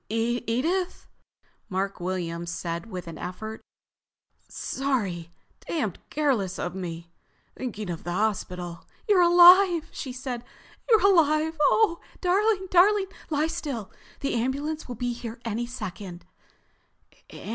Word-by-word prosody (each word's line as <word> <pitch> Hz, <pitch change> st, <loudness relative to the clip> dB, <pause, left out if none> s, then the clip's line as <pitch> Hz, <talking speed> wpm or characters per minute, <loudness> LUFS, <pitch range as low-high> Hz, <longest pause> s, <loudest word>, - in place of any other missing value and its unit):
"Edith," 240 Hz, -, -1 dB, 0.6 s
Mark 195 Hz, +1 st, -2 dB
Williams 175 Hz, -2 st, -3 dB
said 170 Hz, +2 st, -4 dB
with 185 Hz, -4 st, -6 dB
an 165 Hz, -, -8 dB
effort. 215 Hz, +5 st, -6 dB, 0.9 s
"Sorry—damned 210 Hz, -, -3 dB
careless 250 Hz, -12 st, 0 dB
of 175 Hz, -, -3 dB
me. 170 Hz, -2 st, -6 dB, 0.4 s
Thinking 215 Hz, -5 st, -5 dB
of 170 Hz, -2 st, -5 dB
the 175 Hz, -, -4 dB
hospital...." 180 Hz, -3 st, -2 dB, 0.2 s
"You're 400 Hz, -4 st, +5 dB
alive!" 350 Hz, -1 st, +7 dB
she 260 Hz, -, -5 dB
said. 250 Hz, -2 st, -5 dB, 0.5 s
"You're 440 Hz, -4 st, +5 dB
alive! 320 Hz, -4 st, +4 dB
Oh, 340 Hz, +2 st, +4 dB, 0.2 s
darling, 385 Hz, +2 st, +2 dB
darling, 385 Hz, +2 st, +5 dB, 0.2 s
lie 300 Hz, -1 st, +1 dB
still, 290 Hz, -, -4 dB, 0.3 s
the 275 Hz, -, -1 dB
ambulance 280 Hz, +6 st, -2 dB
will 245 Hz, -, -5 dB
be 245 Hz, +1 st, -2 dB
here 235 Hz, 0 st, -7 dB
any 230 Hz, +1 st, -2 dB
second." 195 Hz, -7 st, -7 dB
240 Hz, 115 wpm, -26 LUFS, -, 0.9 s, alive